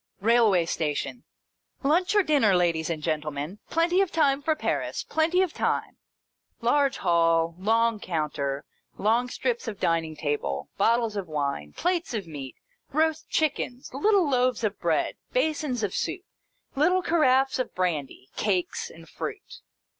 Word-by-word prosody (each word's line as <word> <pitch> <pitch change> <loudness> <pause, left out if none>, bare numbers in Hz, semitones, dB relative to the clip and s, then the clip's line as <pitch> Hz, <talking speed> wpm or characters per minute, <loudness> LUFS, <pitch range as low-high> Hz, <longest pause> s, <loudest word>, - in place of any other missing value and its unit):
Railway 215 -5 +4
station. 160 +9 -3 0.3
" - - -39
Lunch 345 +8 +2
or 415 - +5
dinner, 275 - +3
ladies 170 -3 +1
and 155 -2 -3
gentlemen. 150 +3 -3
Plenty 345 +3 +2
of 390 - +1
time 285 -3 +2
for 315 +2 +1
Paris. - - -2
Plenty 335 +4 +2
of 360 - -3
time! - - -1 0.3
" - - -53
Large 275 +3 +2
hall, 165 -1 +2
long 225 +2 +2
counter, 145 -6 -2 0.3
long 235 +4 +2
strips 475 - -2
of 215 -3 -5
dining 165 -2 0
table, 145 - -2
bottles 230 +1 +2
of 195 -3 -3
wine, 140 - -3
plates 350 -8 -1
of 205 -4 -3
meat, 140 -5 -8 0.4
roast 315 +2 0
chickens, 270 -5 -1
little 380 +5 +3
loaves 255 -2 +1
of 210 -1 -1
bread, - - 0 0.2
basins 305 - 0
of 200 - -1
soup, 370 - -2 0.5
little 360 +6 +3
caraffes 270 -6 +3
of 255 - -3
brandy, 155 -8 -2
cakes, 190 -4 -1
and 165 0 -14
fruit. - - -7
225 Hz, 145 wpm, -26 LUFS, -, 0.5 s, or